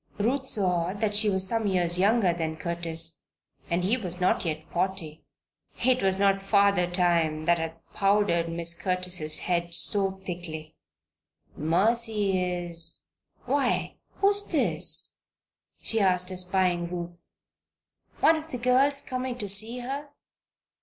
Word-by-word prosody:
Ruth 260 +6 0
saw 180 -5 +2
that 210 0 -1
she 210 +1 +3
was 190 -1 +2
some 225 0 0
years 175 -2 +1
younger 200 -2 +3
than 160 -2 -3
Curtis, 165 -1 -3 0.5
and 170 +1 0
he 215 +7 +2
was 180 -6 -6
not 180 - +2
yet 155 -2 -3
forty. 170 -4 -3 0.6
It 255 0 +4
was 190 -1 +1
not 195 0 +2
Father 200 -2 +3
Time 170 -3 +1
that 170 0 +3
had 165 0 -4 0.2
powdered 195 -4 +2
Mrs. 170 0 -3
Curtis' 180 -4 -1
head 170 -1 -1
so 195 +1 +2
thickly. 165 -4 -6 0.8
"Mercy 200 +4 +1
is 175 -2 -3 0.4
Why, 260 -1 0 0.2
who's 405 +1 +1
this?" - - +1 0.6
she 225 - -1
asked 180 -2 +1
espying 180 -1 0
Ruth. 175 -1 -6 1.0
"One 320 +1 +5
of 315 +1 -8
the 255 - -4
girls 260 +3 +2
come 255 0 -4
in 250 -1 -4
to 210 - -4
see 220 +5 0
her?" 280 +4 -5
185 Hz, 135 wpm, -27 LUFS, 170-215 Hz, 1.0 s, One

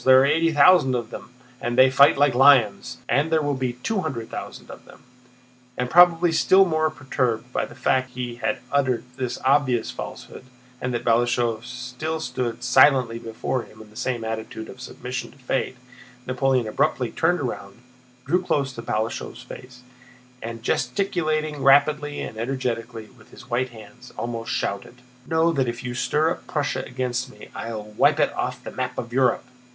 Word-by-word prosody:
There 130 0 +7
are - - +4
eighty 165 +3 +2
thousand 155 -4 +5
of 120 -2 -4
them - - -9 0.3
and 120 +1 -2
they 130 0 +7
fight 140 +2 +6
like 140 -1 +3
lions. 130 -4 +4
And 150 +3 +1
there 160 -1 +2
will 145 0 0
be 130 -2 -2
two 220 -3 0
hundred 125 -9 -5
thousand - - -8
of - - -12
them." - - -17 0.7
And 125 0 -2
probably 175 0 +6
still 190 +4 +5
more 155 -2 +1
perturbed 125 -5 -2
by - - 0
the - - -14
fact 130 0 +1
that - - -8
he 120 -1 -4
had 130 +2 -2
uttered 130 -5 +1
this 130 -2 -3
obvious 130 -4 +2
falsehood, - - -9 0.4
and 125 - -2
that 120 -1 -3
Balashëv 120 -1 +1
still 130 +6 -5
stood 125 -4 -4
silently 130 -3 +4
before 115 +2 -3
him 110 - -15
in 110 -1 -13
the - - -20
same 120 0 -2
attitude 110 0 -5
of 130 - -11
submission 125 0 -6
to - - -22
fate, 130 0 -2 0.5
Napoleon 130 -2 +1
abruptly 125 +1 0
turned 175 +2 +1
round, 125 -2 -5 0.5
drew 180 +1 +2
close 140 -7 -1
to 115 - -7
Balashëv's 110 0 -3
face, 125 0 -12 0.6
and, 115 0 -7
gesticulating 155 +2 -1
rapidly 145 +2 +3
and 110 - -6
energetically 115 -2 -3
with - - -19
his - - -15
white 125 +2 0
hands, 120 +2 -14
almost 115 -1 -4
shouted: 110 +5 -4 0.2
"Know 160 +1 +2
that 135 -5 0
if 120 +1 -6
you 125 0 -4
stir 150 +6 +1
up - - -6
Prussia 145 -2 -1
against 125 0 -3
me, - - -14
I'll 110 -2 -5
wipe 105 0 +2
it - - +2
off - - -4
the - - -7
map 130 0 -4
of 120 0 -5
Europe!" 130 -2 +2
130 Hz, 180 wpm, -23 LUFS, 120-145 Hz, 0.7 s, There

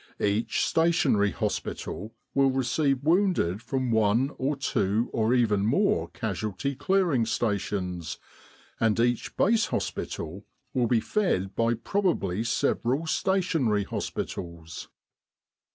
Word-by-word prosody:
Each 105 +3 +1
Stationary 160 -11 +3
Hospital 105 +1 -4 0.2
will 135 -1 +4
receive 135 +1 +1
wounded 165 - +2
from 130 -1 -2
one 110 +5 +2
or 140 +3 0
two 110 -5 0
or 115 +2 +2
even 105 -5 +2
more 145 - +2
Casualty 110 +5 -3
Clearing 155 -2 +2
Stations, 95 -7 -2 0.6
and 110 -1 +2
each 120 0 0
Base 225 +2 +3
Hospital 85 +5 -4 0.3
will 125 -4 +2
be 115 -1 +2
fed 105 - 0
by 115 +1 +2
probably 115 - 0
several 125 +5 0
Stationary 160 - +1
Hospitals. 85 -3 -5
115 Hz, 105 wpm, -27 LUFS, 105-145 Hz, 0.6 s, will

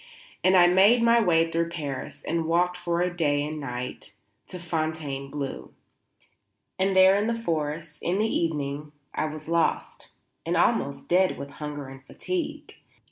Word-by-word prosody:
And 185 0 +5
I 175 - +8
made 195 +7 +5
my 235 0 +5
way 165 -4 +3
through 165 0 0
Paris 150 -6 -6
and 165 -1 -1
walked 175 +2 +2
for 175 -1 -1
a 180 0 -1
day 145 -4 +1
and 155 +1 -5
night 125 -6 -6 0.3
to 185 - -7
Fontainebleau; 150 -5 -4 1.1
and 190 0 +2
there 190 +1 +7
in 205 +2 +1
the 230 0 -1
forest, 155 -5 -3
in 180 +2 0
the 215 - +2
evening, 150 -6 -2 0.2
I - - -1
was 155 0 -7
lost, 170 0 -1 0.4
and - - -1
almost 140 0 +1
dead 185 +1 +3
with 140 0 -7
hunger 145 -1 -6
and 135 0 -12
fatigue. 305 - -5
165 Hz, 155 wpm, -26 LUFS, 145-180 Hz, 1.1 s, I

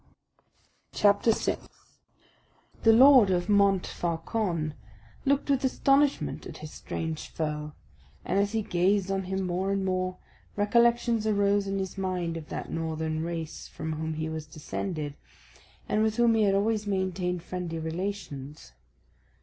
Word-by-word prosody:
CHAPTER 205 +2 +4
6 - - -2 1.1
The 225 - +6
Lord 255 -2 +8
of 175 -1 +1
Montfaucon 180 -3 +1 0.5
looked 280 0 +2
with 275 -2 +1
astonishment 270 - +2
at - - -9
his 155 0 -9
strange 160 -1 -5
foe; 150 -1 -4 0.5
and 195 - +1
as 200 +1 +1
he 220 -1 0
gazed 195 +2 +1
on 195 -1 -1
him 190 0 -2
more 185 +2 -1
and 195 -1 0
more, 185 -1 -1 0.4
recollections 235 +1 +3
arose 200 -1 +2
in 195 0 -1
his 190 0 -4
mind 180 -3 -2
of 160 -2 -7
that - - -5
northern 160 -1 -2
race 165 -2 -5
from 160 0 -5
whom 160 0 -3
he 160 +1 -2
was 160 -1 -5
descended, 155 0 -4 0.7
and 215 - +1
with 220 0 +1
whom 235 -1 +4
he 220 -1 +3
had 195 -1 +3
always 210 +1 +1
maintained 185 -3 -1
friendly 180 -2 -4
relations. 160 - -5
190 Hz, 140 wpm, -28 LUFS, 160-205 Hz, 1.1 s, Lord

